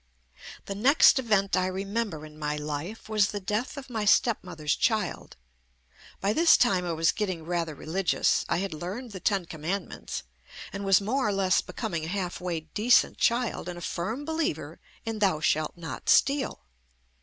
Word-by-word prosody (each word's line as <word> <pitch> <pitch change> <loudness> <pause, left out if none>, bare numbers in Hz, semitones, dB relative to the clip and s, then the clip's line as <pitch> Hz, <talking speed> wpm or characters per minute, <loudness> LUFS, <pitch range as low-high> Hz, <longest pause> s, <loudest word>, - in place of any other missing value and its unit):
The 195 - -4
next 265 +7 +5
event 210 -5 +2
I 185 0 +1
remember 195 -3 -3
in 155 0 -13
my 150 0 -1
life 150 +9 -5
was 215 -2 +3
the 205 - -4
death 210 +8 -3
of 275 - -7
my 225 -4 -3
stepmother's 180 - +2
child. - - -1 0.8
By 200 +2 +1
this 330 +4 +6
time 190 -7 +2
I 170 - -1
was 165 +1 +3
getting 185 -6 -3
rather 170 -2 -2
religious. 175 +6 +1
I - - +2
had 190 -1 -2
learned 195 +10 -6
the 190 - -7
Ten 195 -1 0
Commandments 170 +4 -5 0.5
and 200 0 -4
was 195 -1 +4
more 255 +5 0
or - - +1
less 195 -1 +2
becoming 170 -9 -4
a 175 +5 -3
half 180 -2 -3
way 175 -3 -2
decent 210 +10 +2
child 235 -6 +1
and 175 - -6
a - - -8
firm 220 +12 -3
believer 320 0 -2 0.3
in 225 -1 -3
"Thou 190 -7 +2
shalt 155 +1 0
not 160 -6 -6
steal." 275 - +3
195 Hz, 170 wpm, -27 LUFS, 170-220 Hz, 0.8 s, this